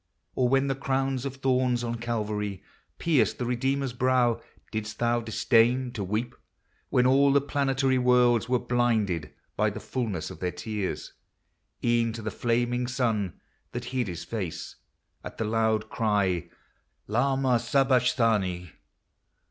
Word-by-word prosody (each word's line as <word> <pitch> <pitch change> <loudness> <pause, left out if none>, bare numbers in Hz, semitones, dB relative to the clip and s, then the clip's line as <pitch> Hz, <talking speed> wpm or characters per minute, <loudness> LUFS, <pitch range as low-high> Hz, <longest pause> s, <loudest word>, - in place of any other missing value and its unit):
Or 125 -1 +1
when 135 +1 +3
the 135 - +1
crown 135 0 -1
of 135 -1 -4
thorns 130 -2 +1
on 120 0 -2
Calvary 105 -4 -3 0.3
Pierced 155 -7 +2
the 125 - -2
Redeemer's 135 +2 -1
brow, 125 -2 +2 0.3
didst 105 -1 -4
thou 120 0 +1
disdain 120 +3 +2
To 105 -4 -4
weep, 110 +5 -2 0.6
when 125 - +3
all 140 +2 +5
the 140 - +5
planetary 135 -2 +1
worlds 125 -2 +3
Were 125 - +3
blinded 110 -11 0 0.2
by - - +2
the - - -6
fulness 105 -11 -3
of - - -10
their 90 - -1
tears? 105 -4 -4 0.7
E'en 120 -1 +2
to 115 -1 -7
the 110 - -3
flaming 120 +3 0
sun, 115 -7 -1 0.3
that 120 0 -4
hid 125 -4 0
his 85 -2 -5
face 95 -8 -5 0.5
At - - -8
the 110 - -1
loud 110 0 +1
cry, 105 - 0 0.3
" - - -42 0.2
Lama 130 +2 +2
Sabachthani 115 - +2
120 Hz, 140 wpm, -27 LUFS, 110-130 Hz, 0.7 s, all